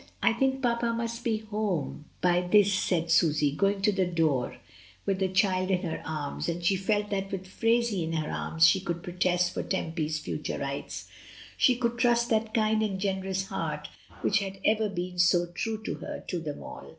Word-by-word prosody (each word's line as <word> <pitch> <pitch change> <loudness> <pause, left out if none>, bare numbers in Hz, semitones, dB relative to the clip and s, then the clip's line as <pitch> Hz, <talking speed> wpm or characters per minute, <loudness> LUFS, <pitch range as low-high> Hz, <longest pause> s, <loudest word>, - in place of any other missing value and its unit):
"I 225 - +5
think 265 +2 0
papa 235 -1 +1
must 235 +1 -3
be 225 -2 +1
home 210 -9 -3 0.2
by 175 0 +3
this," 200 +2 +4
said 170 -3 0
Susy^ 150 -3 +3
going 195 +3 +1
to 210 - +5
the 190 -2 +1
door 160 -7 0 0.5
with 195 -1 0
the 190 - +2
child 185 0 +2
in 185 0 +1
her 165 -3 -3
arms; 155 +1 -3
and 170 +1 -3
she 195 - +4
felt 205 +2 0
that 195 -1 -2
with 190 -1 -4
Phraisie 225 0 +1
in 160 0 -3
her 155 -2 -1
arms 160 0 +2
she 190 - +4
ootild 170 -2 -4
protest 180 0 +1
for - - -2
Tempy's 160 -4 -2
future 150 0 -4
rights. 140 0 -5 0.5
She 250 - +4
could 240 0 -1
trust 240 -1 +3
that 220 0 +1
kind 220 -1 +2
and 200 -3 -1
generous 190 -1 -1
heart - - -3 0.3
which 215 - +3
had 195 -1 -5
ever 215 0 +3
been 180 -1 -4
so 175 0 +4
true 220 +5 -4
to - - -2
her, - - -7
to 180 - -1
them 150 -3 -6
all. - - -9
190 Hz, 195 wpm, -28 LUFS, 175-215 Hz, 0.5 s, I